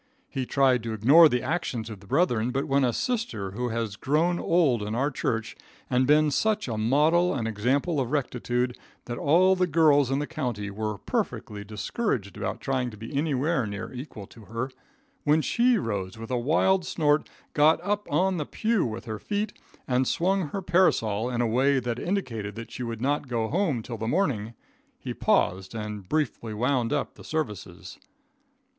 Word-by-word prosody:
He 130 -4 -4
tried 130 -3 +3
to 115 0 -4
ignore 140 +10 +7
the 125 -3 0
action 165 -8 -2
of 105 - -8
the 100 - -17
brethren, 125 - +2
but 135 +2 -1
when 140 0 +2
a 125 - +3
sister 165 - -2
who 120 +5 -3
has 115 -3 -2
grown 165 +9 +1
old 155 -10 +2
in 105 +2 -3
our 140 +5 +1
church, 115 -4 -2 0.4
and 125 0 +3
been 150 +1 +4
such 215 +5 +1
a 115 - -2
model 150 +11 +3
and 115 -4 -2
example 130 - 0
of 125 -3 -1
rectitude 125 -3 -1 0.3
that 120 0 -5
all 180 +6 +4
the 180 -1 +1
girls 150 -4 +4
in 135 - +1
the 145 - -1
county 105 -8 -4
were 105 0 -3
perfectly 105 +2 -3
discouraged 105 - -3
about - - -3
trying 130 -2 -1
to 105 - -11
be 115 +6 -8
anywhere 145 -2 +1
near 100 +4 -6
equal 125 -5 -8
to 110 +2 -15
her; 115 +5 -4 0.5
when 150 +1 +4
she 240 - +3
rose 100 - -3
with 115 +2 -8
a - - +1
wild 170 +8 +2
snort, 150 -3 +1 0.2
got 150 +2 +5
up 205 +2 -2
on 190 0 +2
the 150 - -2
pew 225 -2 +1
with 110 -2 -4
her 110 -2 -5
feet, 210 +1 -2 0.3
and 130 0 +1
swung 185 0 +1
her 195 +6 -5
parasol 125 - +2
in 120 -1 -1
a 120 - +2
way 135 +4 +3
that 120 -1 -3
indicated 115 - -3
that 115 0 -8
she - - -7
would 115 -2 -4
not 140 +2 0
go 115 -3 -1
home 160 - 0
till 115 -1 -6
morning, 115 - -1 0.4
he - - -5
paused 95 +4 +1
and 105 -3 -6
briefly 125 -7 -1
wound 125 0 +1
up - - -1
the - - -14
services. 100 - -5
130 Hz, 185 wpm, -26 LUFS, 110-155 Hz, 0.5 s, ignore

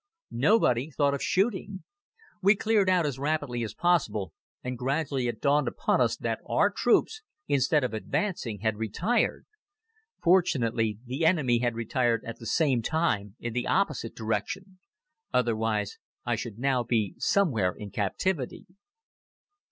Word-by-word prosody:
Nobody 130 - +2
thought 140 -1 +1
of 140 - -3
shooting. 195 -1 0 0.6
We 200 +2 +5
cleared 210 -2 +2
out 180 -3 +3
as 135 -3 -3
rapidly 145 -4 -1
as 110 -1 -6
possible 110 - +1 0.3
and 125 0 -3
gradually 135 0 -1
it 115 -2 -3
dawned 145 -1 +2
upon - - +1
us 115 -1 +2
that 115 -1 -2
our 205 - +3
troops, 245 - +2 0.3
instead 140 +2 +2
of 125 - -2
advancing, 115 - -2
had 110 -1 0
retired. 110 - 0 0.7
Fortunately, 120 - +2
the 130 +6 -3
enemy 145 -8 +3
had 120 -1 0
retired 115 0 0
at 115 - -7
the 115 - -8
same 140 -7 +2
time 110 - -1
in 120 -1 -4
the 125 0 -2
opposite 150 - 0
direction. 150 - -3 0.5
Otherwise 110 -4 0 0.3
I - - +1
should 110 -3 -6
now 130 0 +1
be 115 -4 0
somewhere 120 - +2
in 100 +2 -9
captivity. 130 - -2
125 Hz, 140 wpm, -28 LUFS, 115-170 Hz, 0.7 s, We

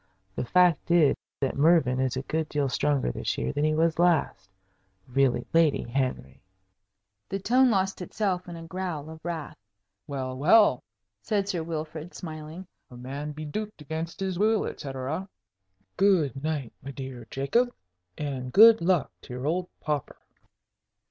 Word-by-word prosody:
The - - -2
fact 180 +2 +3
is 170 -4 +5 0.3
that 135 - 0
Mervyn 140 -4 +4
is 130 -1 0
a 130 - -3
good 160 +2 -2
deal 145 -2 0
stronger 140 - +1
this - - -3
year 65 - -2
than 145 - -1
he 155 0 +2
was 165 +1 +1
last. 160 - +2 0.6
Really, 135 0 +1
Lady 165 -3 +4
Henry 125 - -3 0.4
" 100 0 -55
The 195 - -1
tone 250 +6 +4
lost 190 -3 0
itself 180 -1 -2
in 170 - -7
a 165 0 -8
growl 165 -4 -4
of 160 0 -12
wrath. 165 -3 -5 0.5
"Well, 130 -2 -4
well," 160 - +5 0.4
said 200 - 0
Sir 180 -4 -1
Wilfrid, 160 +1 -5
smiling, 155 +2 -7 0.2
"'A 125 - -12
man 140 +4 -5
beduked 155 +8 -5
against 160 +3 -5
his 190 -2 -2
will,' 220 +1 +3
etcetera. 140 +7 -4 0.7
Good 165 - +3
night, 150 -5 -3
my 135 - -8
dear 130 -4 -7
Jacob, 235 - +1 0.5
and 130 -4 -4
good 225 - +8
luck 175 -4 +2
to - - -10
your 125 +2 -5
old 180 +4 -1
pauper." 150 -3 -2
155 Hz, 155 wpm, -27 LUFS, 135-180 Hz, 0.7 s, good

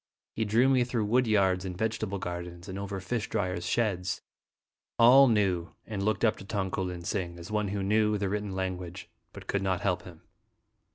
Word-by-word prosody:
He 110 - -1
drew 115 +5 +4
me 130 -2 +4
through 120 -3 -1
woody 115 0 +3
ards 95 -2 +2
and 90 -2 -5
vegetable 110 -1 -1
gardens, 85 0 -6
and 95 0 -5
over 100 0 -4
fish 110 +4 -3
dryers' 90 -2 -2
sheds. 95 -4 0 0.8
All 130 +4 +8
knew 95 -7 +1
and 105 -3 -4
looked 110 +2 +1
up 110 - +2
to - - -10
Tong 95 -2 -2
ko - - -2
lin 90 -2 -4
sing 85 -2 -3
as 85 +3 -9
one 105 -1 0
who 100 0 -2
knew 105 +1 +2
the 100 -1 -1
written 105 0 -3
language, 95 -1 -4 0.2
but - - -11
could 100 - -1
not 95 -2 0
help 90 -2 0
him. 85 -2 -13
100 Hz, 195 wpm, -29 LUFS, 90-110 Hz, 0.8 s, All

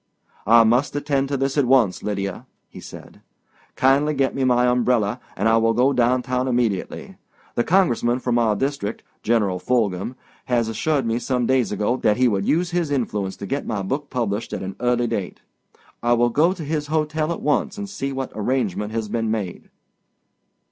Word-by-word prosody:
"I 115 +1 +7
must 120 +6 +2
attend 140 -1 0
to 140 0 -1
this 135 +2 0
at 140 - +3
once, 120 -7 +3
Lydia," 100 -2 -4 0.2
he - - -11
said. - - -12 0.5
"Kindly 140 +3 +3
get 135 -1 +1
me 135 - -1
my 125 -1 +3
umbrella 125 -2 +1 0.2
and 105 - +1
I 115 0 +4
will 115 0 +2
go 130 +4 +3
downtown 125 +1 +1
immediately. 120 -6 -2 0.4
The 120 - +1
congressman 125 -10 +2
from 125 -2 0
our 110 -3 +2
district, 135 -4 -3 0.2
General 105 -5 +1
Fulghum, 110 -1 -1 0.3
assured 120 +4 0
me 115 +1 0
some 125 0 -1
days 130 -1 +1
ago 105 +5 0
that 105 -4 +2
he 130 0 +4
would 100 -4 0
use 175 +3 +1
his 175 -3 0
influence 105 -8 -2
to - - -6
get 140 +9 -3
my 105 -4 -2
book 140 +8 -3
published 115 -4 -2
at - - -4
an 95 0 -6
early 120 0 +1
date. 110 -6 -4 0.6
I 120 0 +2
will 120 0 +3
go 155 +9 +3
to 175 -4 -7
his 150 0 -2
hotel 155 +1 -1
at 170 - -5
once 150 +8 0
and 205 0 -5
see 165 -9 -4
what 135 -1 -4
arrangement 110 -2 -1
has 110 -1 -2
been 115 +1 -2
made." 105 -5 -4
125 Hz, 185 wpm, -22 LUFS, 110-135 Hz, 0.6 s, I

